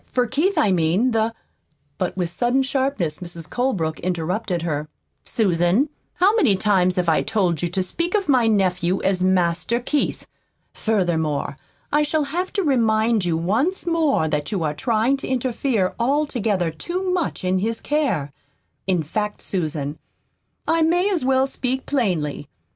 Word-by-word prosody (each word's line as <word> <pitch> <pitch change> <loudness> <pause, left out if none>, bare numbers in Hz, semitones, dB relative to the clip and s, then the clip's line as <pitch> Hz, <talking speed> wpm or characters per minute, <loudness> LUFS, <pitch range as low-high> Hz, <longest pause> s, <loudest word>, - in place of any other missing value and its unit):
for 250 -1 +1
Keith, 315 - 0
I 215 -9 +3
mean. 180 +8 +2
The 225 0 +1 0.3
" 145 -2 -45
But 185 0 -2
with 175 -2 -1
sudden 245 +6 +1
sharpness 265 - -1
Mrs. 170 -2 -7
Colebrook 190 -12 -1
interrupted 180 +1 -2
her. 150 -2 -2 0.4
"Susan, 195 - +2 0.3
how 385 +5 +4
many 270 - +4
times 185 -2 +2
have 180 -1 0
I 160 - +3
told 185 -8 0
you 175 - -1
to 185 +2 0
speak 340 - -1
of 400 -4 0
my 255 -5 +4
nephew 185 -3 +1
as 190 -1 +1
'Master 185 +4 +1
Keith'? 285 +4 -1 0.5
Furthermore, 160 -9 0 0.4
I 295 - +3
shall 300 +1 +1
have 345 +6 -3
to 400 - 0
remind 225 - +2
you 165 -2 +1
once 230 - 0
more 320 - +2
that 150 -1 -2
you 190 -6 -1
are 150 -1 0
trying 230 - +1
to - - -6
interfere 245 -5 0
altogether 235 - 0
too 360 - -3
much 355 - -1
in 185 0 +1
his 225 +3 -1
care. 255 - -1 0.6
In 180 -4 +1
fact, 210 +7 -3
Susan, 155 -5 -3 0.7
I 330 0 +2
may 350 +5 +3
as 345 -8 0
well 265 0 +3
speak 260 -1 -3
plainly. 170 - -1
215 Hz, 160 wpm, -22 LUFS, 175-270 Hz, 0.7 s, how